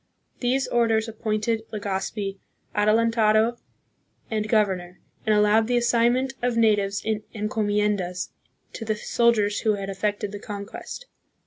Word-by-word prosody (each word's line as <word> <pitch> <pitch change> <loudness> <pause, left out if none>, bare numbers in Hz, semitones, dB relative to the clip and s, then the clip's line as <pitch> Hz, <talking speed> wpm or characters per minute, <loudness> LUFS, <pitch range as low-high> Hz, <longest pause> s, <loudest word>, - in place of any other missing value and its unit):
These 260 +2 +1
orders 225 -2 +2
appointed 220 0 -1
Legazpi 195 -1 -3 0.4
adelantado 220 +1 +3 0.7
and 215 -1 -1
governor, 190 -5 +1 0.3
and 215 - +4
allowed 210 +1 +4
the 245 0 +2
assignment 240 +2 +2
of 245 -1 0
natives 205 -3 +2
in 215 -1 0
encomiendas 205 -3 0 0.4
to - - -6
the 215 -1 -1
soldiers 210 -2 +2
who 215 -2 +2
had 195 -1 -4
effected 205 +1 -2
the 205 - -6
conquest. 205 - -7
215 Hz, 120 wpm, -25 LUFS, 205-230 Hz, 0.7 s, and